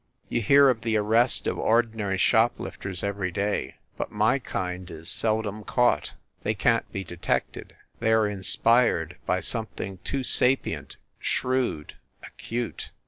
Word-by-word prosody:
You 120 - 0
hear 140 +6 +6
of 125 -4 +1
the 115 -1 0
arrest 115 +4 +3
of - - -2
ordinary 110 -4 +1
shoplifters 100 -4 0
every 100 -2 -2
day, 100 +3 -2 0.2
but - - -3
my 110 +6 +2
kind 90 -6 -5
is 80 0 -7
seldom 110 -1 -1
caught. 120 -13 +1 0.3
They - - -1
can - - +3
t - - -32
be 95 - -4
detected. 85 -1 -3 0.2
They 110 -1 +1
are 110 -1 +4
inspired 100 -3 +2
by 90 0 +1
something 105 -5 -3
too 135 +8 -3
sapient, 130 +1 +3 0.2
shrewd, 125 - -2 0.3
acute. 120 0 -5
110 Hz, 140 wpm, -26 LUFS, 95-120 Hz, 0.3 s, hear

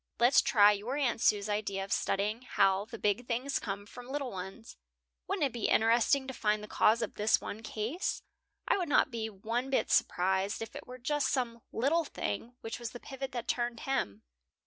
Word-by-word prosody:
Let's 245 +3 +6
try 205 -3 +6
your 215 +7 -2
Aunt 250 -6 0
Sue's 205 -1 +3
idea 205 -2 -1
of 195 - -2
studying 210 +4 0
how 195 -5 +2
the 230 +1 -8
big 210 +3 0
things 255 +4 -1
come 200 -1 -5
from 245 +4 -11
little 275 -1 -3
ones. 190 +5 -8 0.5
Wouldn't 380 -6 +1
it 270 - -2
be 235 -3 -1
interesting 235 +5 +3
to 265 - -5
find 210 -2 0
the - - -7
cause 225 +2 +3
of 220 - -4
this 210 +1 +3
one 215 - -6
case? 225 - -3 0.4
I - - +3
would 355 - -2
not 280 - +4
be 225 -2 -3
one 230 +6 -3
bit 270 - +1
surprised 190 +3 +2
if 225 - -7
it - - -8
were 250 - -8
just 290 +4 0
some 235 -3 -1
little 295 +8 +2
thing 230 - -4
which 225 +1 -5
was 235 -2 -5
the 245 - -7
pivot 270 +1 -6
that 240 -1 -4
turned 240 -1 -1
him." 110 - -2
230 Hz, 200 wpm, -31 LUFS, 210-255 Hz, 0.5 s, Let's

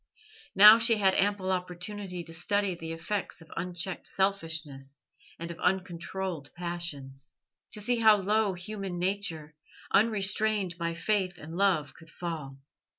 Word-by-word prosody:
Now 210 +3 +10
she 230 0 +4
had 190 -2 +4
ample 195 -1 +1
opportunity 180 +1 -4
to 165 0 -11
study 200 +3 0
the 165 -1 -7
effects 180 +5 -4
of 165 -1 -14
unchecked 180 +1 -3
selfishness 160 -8 -2 0.3
and 170 +1 -6
of 170 - -10
uncontrolled 180 -3 -2
passions; 160 -6 -3 0.4
to - - +3
see 245 +4 +1
how 220 -2 +6
low 205 0 +1
human 195 0 -5
nature, 175 -5 -2 0.4
unrestrained 210 -3 +2
by 170 0 -2
faith 185 0 0
and 160 +2 -9
love, 175 -8 +1
could 165 0 -17
fall. 160 -6 -6
180 Hz, 135 wpm, -29 LUFS, 165-200 Hz, 0.4 s, Now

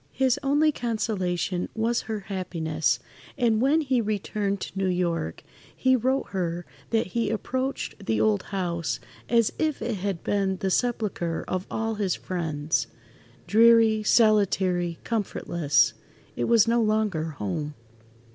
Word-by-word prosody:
His 265 +1 +2
only 290 +2 +3
consolation 200 - -2
was 230 +1 +1
her 215 -2 -2
happiness, 170 -5 -1 0.4
and 225 -2 +2
when 290 +5 +4
he 260 -5 +1
returned 205 -1 -2
to - - -6
New 190 0 0
York, 170 - -1 0.3
he 260 0 +3
wrote 260 +3 0
her 175 -2 -2 0.2
that 225 0 +1
he 235 -1 0
approached 260 +4 -3
the 110 -1 +1
old 110 -1 +3
house 170 - -2 0.3
as 230 -2 +3
if 310 -2 0
it 225 -2 -2
had 195 -2 -3
been 195 -2 0
[Pg - - -5
68]the 190 - +1
sepulchre 205 -8 -1
of 185 0 -3
all 225 +1 -1
his 190 -3 +1
friends. 155 -8 -2 0.6
"Dreary, 225 0 +5
solitary, 190 -6 +3
comfortless—it 175 -8 -1
was 230 -2 +5
no 235 +1 +3
longer 215 -7 +1
home." 145 +10 -3
205 Hz, 135 wpm, -26 LUFS, 175-230 Hz, 0.6 s, Dreary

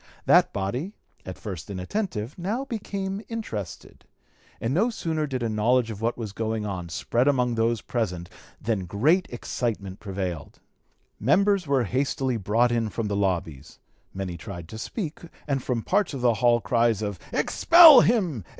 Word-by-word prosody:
That - - +5
body, 125 - -3 0.3
at 95 - -6
first 95 -7 -7
inattentive, 105 - -4
now 210 +10 -3
became 200 -5 -4
interested, 210 - -6 0.6
and 115 +3 -2
no 210 +10 +2
sooner 160 -8 -2
did 130 -3 -3
a - - 0
knowledge 115 +2 +1
of 105 -1 -8
what 115 +1 -1
was 110 -4 -5
going 110 +1 -2
on 90 -4 -5
spread 120 - 0
among 125 -4 +2
those 115 0 0
present 90 -8 -3 0.3
than 105 -5 -2
great 150 - +2
excitement 110 -5 -4
prevailed. 95 -6 -5 0.6
Members 195 - +2
were 135 -3 +2
hastily 130 +2 -1
brought 115 +4 +2
in 115 -2 0
from 105 0 -3
the 100 - -1
lobbies; 85 -7 -2 0.3
many 95 -2 -5
tried 85 -3 -8
to 110 - -8
speak, 165 - -5 0.3
and 135 -2 0
from 120 -3 -2
parts 195 -6 0
of 130 - -5
the 120 -1 +4
hall 120 +1 +3
cries 115 -2 +1
of 100 -3 -4
"Expel 330 -6 +8
him! 180 - +1
115 Hz, 160 wpm, -25 LUFS, 100-150 Hz, 0.6 s, Expel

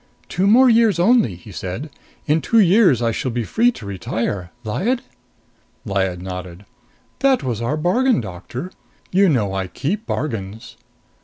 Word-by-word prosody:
"Two 185 +2 0
more 250 +5 +6
years 225 -4 +4
only!" 190 - +3
he 90 +4 -13
said. 95 - -6 0.3
"In 155 +2 +2
two 230 - +1
years 185 - +4
I 115 - +2
shall 130 +4 -2
be 120 0 -2
free 235 - +2
to 110 - -10
retire, 95 -1 -3
Lyad?" 215 - -1 0.8
Lyad 95 -3 -1
nodded. 90 0 -7 0.5
"That 270 -1 +3
was 120 -4 -2
our 125 +6 -1
bargain, 235 +11 +2
Doctor. 120 - -7 0.4
You 195 +1 +4
know 105 -10 +1
I 95 -1 -2
keep 195 - -3
bargains." 110 -7 -4
130 Hz, 150 wpm, -20 LUFS, -, 0.8 s, more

